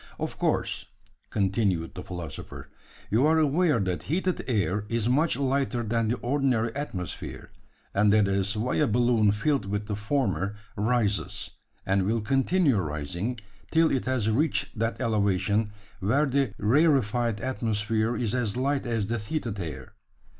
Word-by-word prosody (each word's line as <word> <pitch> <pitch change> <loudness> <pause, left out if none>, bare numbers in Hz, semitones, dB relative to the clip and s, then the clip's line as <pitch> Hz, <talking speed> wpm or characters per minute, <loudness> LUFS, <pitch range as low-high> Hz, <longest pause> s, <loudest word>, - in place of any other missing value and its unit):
Of - - -3
course," - - 0 0.4
continued 95 -4 0
the - - -6
philosopher, 85 -6 -8 0.4
"you 115 +5 +3
are 160 +1 +4
aware 155 -2 +3
that 95 -3 -1
heated 185 +3 0
air 105 -4 0
is 115 -1 0
much 150 +6 +2
lighter 135 -3 0
than 115 0 0
the 120 +3 0
ordinary 125 -3 +1
atmosphere; 95 - -5 0.4
and 105 +1 +4
that 105 -1 +4
is 100 +2 0
why 120 +4 0
a 150 - +3
balloon 115 -2 +3
filled 110 +1 0
with 105 +1 -2
the 105 -1 -3
former, 105 -3 -1 0.2
rises, 105 -1 0 0.3
and 95 +1 +2
will 115 +1 +1
continue 135 - +2
rising, 85 - -3 0.3
till 165 0 +4
it 130 - 0
has 130 -4 0
reached 135 +8 0
that 115 +1 -1
elevation, 105 -2 +1 0.3
where 130 +10 +2
the 135 -5 0
rarefied 120 -3 +2
atmosphere 110 -2 -1
is 115 -2 -1
as 120 -4 -1
light 135 0 0
as 115 -3 0
the 115 +3 -2
heated 110 -2 -3
air. 80 -6 -6
115 Hz, 145 wpm, -27 LUFS, 100-130 Hz, 0.4 s, are